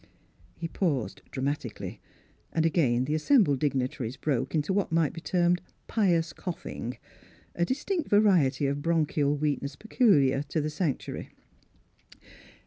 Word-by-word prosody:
He 165 - -3
paused 140 - -1
dramatically, 140 +2 -4 0.5
and 160 -1 +1
again 130 -7 +2
the 150 - -1
assembled 155 - +3
dignitaries 130 -3 -1
broke 135 -1 -1
into 155 +5 +1
what 200 -3 0
might 165 -3 +2
be 165 - -8
termed 175 0 +2 0.2
pious 170 -7 +1
coughing, 165 - -6 0.6
a 175 - +1
dis 260 +9 -3
tinct 365 -6 -1
variety 180 -10 +4
of 140 +1 -1
bronchial 150 -3 +1
weakness 145 -1 -1
pecul 210 - +3
iar 135 +2 0
to 160 - -1
the 155 0 -2
sanctuary. 150 -3 -3
155 Hz, 135 wpm, -28 LUFS, 140-175 Hz, 0.6 s, variety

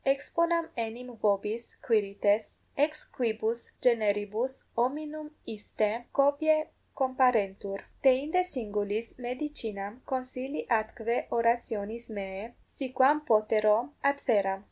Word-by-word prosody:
Exponam 335 +5 +1
enim 235 +2 -5
vobis, 210 +3 +1 0.2
Quirites, 205 -1 +2 0.3
ex 300 +2 0
quibus 230 -1 0 0.3
generibus 215 +1 +2 0.2
hominum 300 +5 -1 0.3
istae 210 0 -1 0.3
copiae 310 +2 +4 0.3
comparentur; 220 -7 +2 0.2
deinde 280 +7 +4
singulis 210 -2 -2 0.2
medicinam 230 -7 -4 0.2
consilii 260 +2 -3 0.2
atque 230 +2 -2 0.2
orationis 230 -1 0
meae, 195 0 -5 0.3
si 275 - -4
quam 275 +3 +6
potero, 215 -1 +4 0.3
adferam. 205 -9 +1
235 Hz, 90 wpm, -30 LUFS, 210-270 Hz, 0.3 s, quam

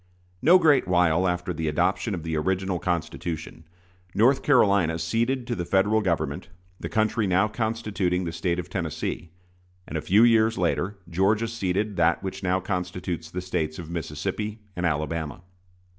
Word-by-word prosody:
No 170 +7 +7
great 150 - +4
while 90 0 +3
after 90 0 -1
the 80 -1 -3
adoption 75 - 0
of 85 - -6
the 80 -1 -2
original 95 +3 -1
Constitution, 80 -1 -4 0.5
North 130 +5 +4
Carolina 100 - +3
ceded 115 +10 0
to 120 - -2
the 90 - -3
Federal 105 +4 +2
Government 90 -5 -2 0.3
the - - -5
country 110 -1 +1
now 95 +3 +3
constituting 105 -5 -1
the 85 - -3
State 85 +1 -1
of 90 -1 -4
Tennessee; 85 -2 -4 0.6
and 80 - -7
a 80 - -1
few 105 +8 +4
years 115 -1 +4
later 90 +2 0
Georgia 100 +6 +1
ceded 105 -2 -2
that 85 +2 +2
which 95 0 -5
now 95 0 +1
constitutes 90 -3 -4
the 90 +2 -4
States 80 -4 -2
of 85 -2 -8
Mississippi 95 +7 -4
and 90 -1 0
Alabama. 80 +1 -3
90 Hz, 160 wpm, -25 LUFS, 85-105 Hz, 0.6 s, No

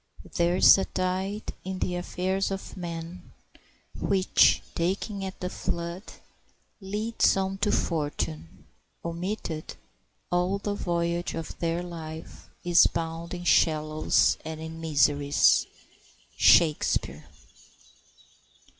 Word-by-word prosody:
] - - -18
"There 175 0 +2
is 190 - +7
a 195 - 0
tide 190 +3 -3
in 190 0 -4
the 180 -1 -2
affairs 185 +2 -1
of 195 0 -6
men, 170 -1 -7 0.6
Which, 190 -1 +3
taken 195 +4 -2
at 190 0 -6
the 180 - -3
flood, 170 +2 -4 0.8
leads 210 +2 +1
on 195 0 -2
to 205 +1 +1
fortune; 145 - -3 0.4
Omitted, 170 -1 -4 0.6
all 180 +2 +1
the 205 +1 -3
voyage 170 -2 -2
of 165 -1 -6
their 170 +1 -1
life 160 -2 -9
Is 175 -1 +6
bound 165 +1 -4
in 175 - -7
shallows 155 -2 +2
and 160 0 -6
in 160 +1 -7
miseries." 145 -2 +3 0.7
—SHAKESPEARE. 150 - +3
175 Hz, 110 wpm, -27 LUFS, 160-190 Hz, 0.8 s, is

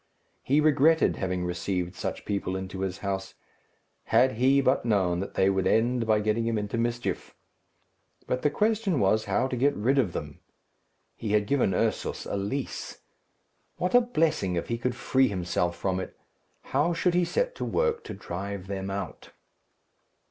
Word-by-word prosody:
He 140 +3 +2
regretted 155 +1 +4
having 90 -1 -2
received 90 0 -2
such 90 - -5
people 100 -2 -2
into 95 0 -5
his 95 -1 -2
house. 95 -1 -3 0.7
Had 125 +4 +4
he 130 +4 +3
but 135 0 +2
known 95 -6 +1
that 95 - -5
they 95 - +3
would 95 -1 +1
end 120 +2 +2
by 110 -1 +3
getting 110 +2 0
him 115 -1 0
into 105 +1 -3
mischief! 120 +1 -2 0.9
But 125 - -1
the 150 - +3
question 210 - +1
was 105 +2 +2
how 100 +5 +1
to 130 - -3
get 140 +4 +2
rid 130 +7 +2
of 100 -10 +1
them? 75 -1 -6 0.8
He 105 -2 -3
had 105 -1 +3
given 115 -6 +1
Ursus - - -1
a - - -3
lease. 100 +8 -4 0.8
What 180 +4 -1
a 245 - +7
blessing 160 - 0
if 85 - -3
he 115 0 -1
could 125 0 -1
free 130 +2 +2
himself 90 -3 -1
from 95 -1 -1
it! 95 - -7 0.5
How 150 +6 +1
should 175 +1 +1
he 180 0 +3
set - - 0
to - - -3
work 470 -1 0
to - - -6
drive 95 +2 -5
them 95 0 -4
out? 100 +1 -5
110 Hz, 170 wpm, -27 LUFS, 95-140 Hz, 0.9 s, a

